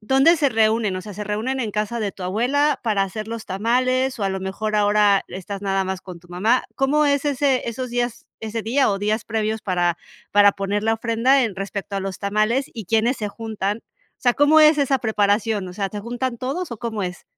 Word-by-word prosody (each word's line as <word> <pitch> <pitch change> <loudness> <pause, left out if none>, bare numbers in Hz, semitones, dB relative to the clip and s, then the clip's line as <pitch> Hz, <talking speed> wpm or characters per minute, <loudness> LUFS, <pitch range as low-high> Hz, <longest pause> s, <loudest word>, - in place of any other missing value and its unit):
¿dónde 270 +9 +4
se 285 -2 +2
reúnen? 220 -3 +2
O - - -4
sea, 210 -3 -9
se 210 +1 -5
reúnen 225 +6 -2
en 220 -3 -2
casa 215 +2 -2
de 205 -2 -2
tu 190 - -10
abuela 250 +10 +1
para 210 -4 +1
hacer 215 +3 -6
los 230 -1 -6
tamales, 255 +6 0
o - - 0
a - - +1
lo 190 0 -3
mejor 210 +3 -2
ahora 205 -1 +3
estás 195 +2 -7
nada 195 -1 0
más 190 0 -3
con 180 -3 -10
tu 175 - -21
mamá. 215 +8 +1
¿Cómo 290 +3 +2
es 280 0 +1
ese 275 -3 +1
esos 250 +1 -4
días, 240 -1 -2
ese 220 0 -4
día 250 +1 +2
o 195 - -1
días 210 +2 -1
previos 220 0 -2
para 175 -3 0 0.4
para 205 0 +6
poner 200 +1 -2
la 225 0 +3
ofrenda 235 +4 +2
en 200 -4 -4
respecto 195 0 -4
a - - -1
los 195 -1 -5
tamales 215 +6 0
y 220 -3 -6
quiénes 225 +5 +2
se 210 -2 -2
juntan? 215 -1 -3 0.4
O - - -35
sea, 245 -1 +3
¿cómo 300 +2 +5
es 305 0 +6
esa 275 -1 +2
preparación? 210 -2 +1
O - - -8
sea, 195 0 -2
¿te 210 - -5
juntan 240 +2 -3
todos 280 +5 -3
o 225 - -7
cómo 220 -4 -3
es? 180 -1 -5
220 Hz, 225 wpm, -22 LUFS, 200-250 Hz, 0.4 s, para